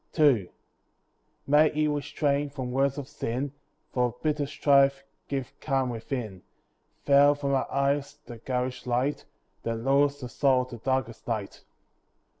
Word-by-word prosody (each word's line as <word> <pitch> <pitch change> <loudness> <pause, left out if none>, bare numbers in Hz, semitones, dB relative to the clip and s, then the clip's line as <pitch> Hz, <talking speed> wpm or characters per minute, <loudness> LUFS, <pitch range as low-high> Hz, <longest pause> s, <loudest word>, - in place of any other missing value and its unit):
II 130 - +4 1.0
May 150 +2 +5
He 155 0 0
restrain 145 0 0
from 130 -3 -5
words 135 +2 +1
of 140 -2 -5
sin; 130 +2 -3 0.4
For 125 -2 +1
bitter 150 -2 0
strife 140 -1 +3 0.2
give 135 -3 -4
calm 135 -3 0
within; 115 -4 -5 0.6
Veil 145 +1 +6
from 140 -1 -2
our 135 - 0
eyes 140 +1 0
the 120 -2 -9
garish 125 +1 -3
light, 125 +4 0 0.4
That 115 - -2
lures 140 +4 +2
the 125 - -6
soul 130 +1 +2
to 120 - -6
darkest 130 -1 -2
night. 110 -4 -4
135 Hz, 135 wpm, -27 LUFS, 125-145 Hz, 1.0 s, Veil